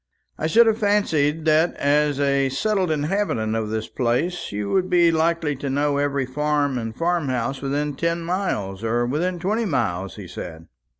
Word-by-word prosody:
"I 155 Hz, -, -2 dB
should 230 Hz, +9 st, +6 dB
have 225 Hz, 0 st, +2 dB
fancied 165 Hz, -8 st, +1 dB
that, 160 Hz, +2 st, +3 dB
as 145 Hz, 0 st, +1 dB
a 140 Hz, -1 st, +2 dB
settled 190 Hz, +6 st, 0 dB
inhabitant 150 Hz, -, -1 dB
of 110 Hz, -1 st, -2 dB
the 110 Hz, 0 st, -3 dB
place, 130 Hz, +9 st, -1 dB
you 100 Hz, 0 st, -3 dB
would 185 Hz, -1 st, +1 dB
be 175 Hz, -1 st, +4 dB
likely 160 Hz, -2 st, +1 dB
to 140 Hz, +1 st, -4 dB
know 145 Hz, +1 st, +1 dB
every 140 Hz, -2 st, 0 dB
farm 145 Hz, 0 st, 0 dB
and 115 Hz, -1 st, -5 dB
farm 170 Hz, -4 st, 0 dB
house 130 Hz, +2 st, -2 dB
within 145 Hz, +2 st, -1 dB
ten 170 Hz, +4 st, -1 dB
miles 140 Hz, -, -2 dB
or 120 Hz, +2 st, +1 dB
within 170 Hz, +8 st, -1 dB
twenty 210 Hz, +6 st, -1 dB
miles," 95 Hz, -, -1 dB
he 100 Hz, -4 st, -9 dB
said. 80 Hz, -2 st, -8 dB
145 Hz, 175 wpm, -22 LUFS, 125-170 Hz, -, should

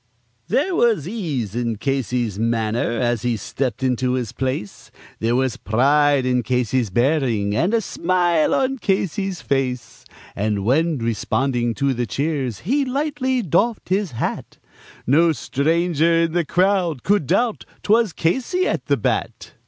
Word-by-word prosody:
There 380 Hz, -, +1 dB
was 225 Hz, -, +2 dB
ease 150 Hz, -, -3 dB
in 120 Hz, -2 st, -1 dB
Casey's 125 Hz, -4 st, -2 dB
manner 115 Hz, +1 st, 0 dB
as 120 Hz, -3 st, 0 dB
he 120 Hz, -1 st, 0 dB
stepped 130 Hz, +4 st, -3 dB
into 125 Hz, 0 st, +1 dB
his 125 Hz, -4 st, -2 dB
place, 130 Hz, -6 st, -4 dB, 0.3 s
There 115 Hz, +2 st, +1 dB
was 130 Hz, -3 st, 0 dB
pride 140 Hz, +4 st, +2 dB
in 125 Hz, -1 st, +1 dB
Casey's 125 Hz, -1 st, 0 dB
bearing, 120 Hz, -, +1 dB
and 175 Hz, -, +1 dB
a 230 Hz, -1 st, +2 dB
smile 175 Hz, -4 st, +1 dB
on 270 Hz, 0 st, 0 dB
Casey's 195 Hz, -3 st, -1 dB
face; 125 Hz, -4 st, -2 dB, 0.3 s
And 100 Hz, -1 st, -1 dB
when, 155 Hz, +6 st, +2 dB
responding 120 Hz, +1 st, -1 dB
to 140 Hz, -1 st, +1 dB
the 120 Hz, -1 st, -2 dB
cheers, 140 Hz, -3 st, -2 dB
he 275 Hz, -, +1 dB
lightly 260 Hz, -2 st, -1 dB
doffed 200 Hz, -, 0 dB
his 190 Hz, -4 st, 0 dB
hat, 115 Hz, -, -4 dB, 0.5 s
No 160 Hz, +6 st, +4 dB
stranger 165 Hz, +3 st, +1 dB
in 165 Hz, -, 0 dB
the 170 Hz, 0 st, 0 dB
crowd 180 Hz, -6 st, +1 dB
could 200 Hz, -8 st, +1 dB
doubt 220 Hz, +6 st, +1 dB, 0.2 s
'twas 220 Hz, -1 st, +3 dB
Casey 265 Hz, -, 0 dB
at -, -, -2 dB
the -, -, +2 dB
bat. -, -, -2 dB
140 Hz, 145 wpm, -21 LUFS, 120-185 Hz, 0.5 s, No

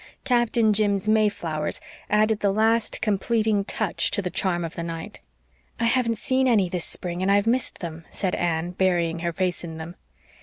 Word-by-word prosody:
Captain 240 Hz, -4 st, +3 dB
Jim's 205 Hz, -1 st, +1 dB
mayflowers 200 Hz, -8 st, +1 dB, 0.3 s
added 215 Hz, 0 st, +3 dB
the 200 Hz, -1 st, +2 dB
last 225 Hz, +2 st, +1 dB
completing 215 Hz, 0 st, +1 dB
touch 210 Hz, -1 st, 0 dB
to -, -, -1 dB
the 185 Hz, -3 st, -2 dB
charm 180 Hz, -3 st, 0 dB
of 165 Hz, -, -6 dB
the -, -, -5 dB
night. 165 Hz, -1 st, -6 dB, 0.6 s
"I -, -, -1 dB
haven't 230 Hz, -1 st, +2 dB
seen 260 Hz, +3 st, +1 dB
any 205 Hz, -7 st, +3 dB
this 175 Hz, -1 st, -3 dB
spring, 175 Hz, 0 st, -3 dB
and 190 Hz, +1 st, +2 dB
I've 200 Hz, +1 st, +3 dB
missed 245 Hz, +3 st, -1 dB
them," 165 Hz, -2 st, -6 dB
said 185 Hz, -2 st, -2 dB
Anne, 170 Hz, 0 st, -1 dB
burying 175 Hz, -3 st, +1 dB
her 170 Hz, 0 st, -1 dB
face 180 Hz, +1 st, -2 dB
in 165 Hz, -2 st, -7 dB
them. 165 Hz, +2 st, -7 dB
195 Hz, 180 wpm, -24 LUFS, 175-220 Hz, 0.6 s, Captain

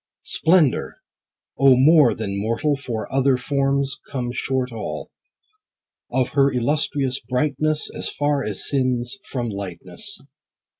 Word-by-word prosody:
Splendor! 160 Hz, -6 st, +2 dB, 0.6 s
O 135 Hz, -1 st, +7 dB
more 145 Hz, -1 st, +6 dB
than 100 Hz, -2 st, -3 dB
mortal 115 Hz, +7 st, 0 dB
For 120 Hz, -6 st, -5 dB
other 135 Hz, -1 st, +3 dB
forms 140 Hz, +1 st, 0 dB
come 125 Hz, -3 st, -3 dB
short 130 Hz, 0 st, -1 dB
all, 110 Hz, -2 st, -6 dB, 1.0 s
Of 130 Hz, -2 st, +1 dB
her 140 Hz, -1 st, +3 dB
illustrious 135 Hz, +1 st, 0 dB
brightness 150 Hz, +5 st, 0 dB
As -, -, -4 dB
far 145 Hz, -1 st, 0 dB
as 105 Hz, -3 st, -3 dB
sin's 130 Hz, +3 st, 0 dB
from 120 Hz, -3 st, -4 dB
lightness. 100 Hz, -4 st, -5 dB
130 Hz, 115 wpm, -22 LUFS, 120-140 Hz, 1.0 s, O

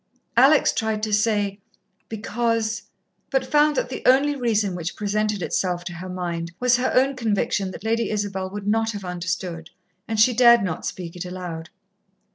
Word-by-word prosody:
Alex 275 Hz, +5 st, +5 dB
tried 220 Hz, -1 st, -1 dB
to 215 Hz, -1 st, -1 dB
say, 205 Hz, -2 st, +1 dB, 0.5 s
"Because 225 Hz, 0 st, -1 dB, 0.2 s
" -, -, -48 dB
but 270 Hz, -1 st, 0 dB
found 300 Hz, 0 st, +3 dB
that 245 Hz, -, -1 dB
the 255 Hz, -, -5 dB
only 275 Hz, +3 st, +4 dB
reason 220 Hz, -7 st, 0 dB
which 175 Hz, 0 st, -4 dB
presented 210 Hz, -1 st, -1 dB
itself 180 Hz, -2 st, -1 dB
to 175 Hz, -, -6 dB
her 180 Hz, +2 st, -7 dB
mind 170 Hz, -2 st, -4 dB
was 245 Hz, -1 st, +3 dB
her 250 Hz, -, 0 dB
own 270 Hz, +2 st, +3 dB
conviction 205 Hz, -4 st, 0 dB
that 185 Hz, -, -9 dB
Lady 230 Hz, +1 st, 0 dB
Isabel 200 Hz, -3 st, -2 dB
would 200 Hz, +1 st, -7 dB
not 225 Hz, +2 st, +1 dB
have 200 Hz, -2 st, -6 dB
understood, 180 Hz, -1 st, -4 dB, 0.4 s
and 220 Hz, -1 st, -2 dB
she 245 Hz, +3 st, +5 dB
dared 235 Hz, -1 st, +6 dB
not 170 Hz, -4 st, -3 dB
speak 175 Hz, -2 st, -6 dB
it 180 Hz, -, -5 dB
aloud. 180 Hz, -3 st, -6 dB
210 Hz, 175 wpm, -23 LUFS, 185-235 Hz, 0.5 s, dared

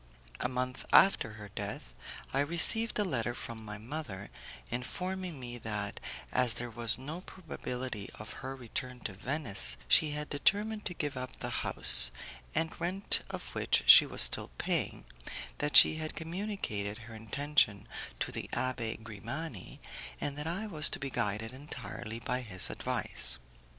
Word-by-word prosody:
A 125 Hz, -, -1 dB
month 125 Hz, 0 st, -3 dB
after 190 Hz, -, +5 dB
her 105 Hz, -1 st, -10 dB
death, -, -, -7 dB, 0.4 s
I 135 Hz, -, +1 dB
received 170 Hz, +10 st, +2 dB
a 210 Hz, -, +2 dB
letter 120 Hz, -, -2 dB
from 115 Hz, -2 st, -7 dB
my 105 Hz, -1 st, -7 dB
mother 110 Hz, -4 st, -7 dB, 0.4 s
informing 180 Hz, +6 st, -4 dB
me 120 Hz, -1 st, -7 dB
that, 105 Hz, -2 st, -5 dB, 0.3 s
as 125 Hz, -3 st, +2 dB
there 120 Hz, 0 st, -3 dB
was 115 Hz, -1 st, 0 dB
no 150 Hz, +7 st, -7 dB
probability 125 Hz, -, -6 dB
of 105 Hz, -, -9 dB
her 135 Hz, +1 st, -5 dB
return 125 Hz, 0 st, -6 dB
to 100 Hz, -, -5 dB
Venice, 100 Hz, -, 0 dB
she 150 Hz, -, +5 dB
had 150 Hz, 0 st, -4 dB
determined 210 Hz, +8 st, 0 dB
to 175 Hz, -, -3 dB
give 145 Hz, -2 st, -3 dB
up 130 Hz, -1 st, -6 dB
the -, -, -6 dB
house, -, -, +8 dB, 0.5 s
the 160 Hz, 0 st, +2 dB
rent 185 Hz, +4 st, -1 dB
of -, -, -7 dB
which -, -, +1 dB
she -, -, +10 dB
was -, -, +7 dB
still -, -, +6 dB
paying, -, -, -2 dB, 0.5 s
that 145 Hz, 0 st, +5 dB
she 155 Hz, -, +8 dB
had 155 Hz, 0 st, -5 dB
communicated 165 Hz, -, -4 dB
her 115 Hz, -, -11 dB
intention 110 Hz, -1 st, 0 dB, 0.3 s
to -, -, -2 dB
the -, -, -5 dB
Abbé 120 Hz, -4 st, -2 dB
Grimani, 115 Hz, -, -7 dB, 0.4 s
and 140 Hz, -, -2 dB
that 150 Hz, +2 st, -5 dB
I 185 Hz, +6 st, -3 dB
was 155 Hz, -8 st, +3 dB
to -, -, -4 dB
be 135 Hz, -1 st, -5 dB
guided 110 Hz, 0 st, -2 dB
entirely 125 Hz, -5 st, -7 dB
by 125 Hz, +2 st, -3 dB
his 95 Hz, -7 st, +3 dB
advice. 65 Hz, 0 st, +1 dB
125 Hz, 155 wpm, -31 LUFS, 110-155 Hz, 0.5 s, she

